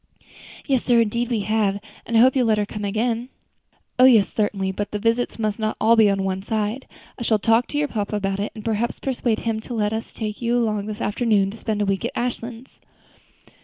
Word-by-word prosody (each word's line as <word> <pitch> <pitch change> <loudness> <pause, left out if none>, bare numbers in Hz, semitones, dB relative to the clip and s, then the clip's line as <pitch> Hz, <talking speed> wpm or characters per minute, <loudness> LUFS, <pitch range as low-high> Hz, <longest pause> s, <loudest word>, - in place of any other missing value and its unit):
"Yes, 265 -4 +1
sir, 240 -2 +4
indeed 235 +2 -1
we 230 -4 0
have; 205 -1 0 0.3
and 230 - +1
I - - +7
hope 260 +2 +5
you 265 - +3
will 240 - +2
let 215 -1 +3
her 210 - +1
come 210 +1 -7
again." 230 +4 -1 0.7
"Oh! 255 - +8
yes, 225 -7 +5
certainly; 200 -3 0
but 205 +2 -4
the 210 - -3
visits 230 +3 0
must 215 -2 -2
not 215 0 -1
be - - -2
all 230 +1 +5
on 195 -1 -1
one 190 0 -2
side. 215 +4 -2 0.3
I - - -8
shall 225 -2 +2
talk 225 +3 +2
to 290 - -4
your 295 0 +1
papa 210 -4 -3
about 195 -1 -1
it, 205 - -2
and 215 - -9
perhaps 225 +1 -1
persuade 240 -4 -1
him 225 -1 -1
to 240 +2 -7
let 210 -1 0
us 220 +1 -4
take 215 0 -5
you 240 0 +1
along 215 -3 0
this 215 +1 -6
afternoon 205 -3 +1
to 220 - -10
spend 215 -2 -2
a - - 0
week 195 +1 -1
at 235 - -3
Ashlands." 240 0 -5
220 Hz, 235 wpm, -22 LUFS, 205-235 Hz, 0.7 s, Oh